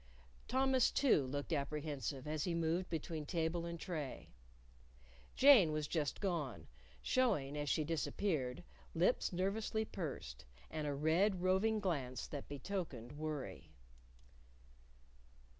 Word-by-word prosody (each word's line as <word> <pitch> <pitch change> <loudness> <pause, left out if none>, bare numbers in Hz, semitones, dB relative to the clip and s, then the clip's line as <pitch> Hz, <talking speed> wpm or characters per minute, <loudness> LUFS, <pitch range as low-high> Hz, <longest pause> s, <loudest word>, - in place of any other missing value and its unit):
Thomas, 260 0 +3
too, 225 - +3
looked 145 +4 -3
apprehensive 145 -2 -3
as 155 0 -1
he 175 -2 0
moved 170 +2 0
between 160 -1 -3
table 165 +1 -1
and 170 0 -5
tray. 155 -8 -5 1.0
Jane 255 - +8
was 155 -1 -1
just 150 -4 -1
gone, 150 - -2 0.4
showing, 195 - +2
as 145 -1 -2
she 155 - +2
disappeared, 155 -3 -1 0.3
lips 175 +9 +2
nervously 205 +4 -1
pursed, 135 - -5 0.3
and 155 -1 -2
a 145 - -1
red, 175 +6 +2
roving 200 +4 +3
glance 140 -10 -2
that 145 -2 -7
betokened 145 - -4
worry. 150 -2 -5
160 Hz, 115 wpm, -37 LUFS, 145-190 Hz, 1.0 s, Jane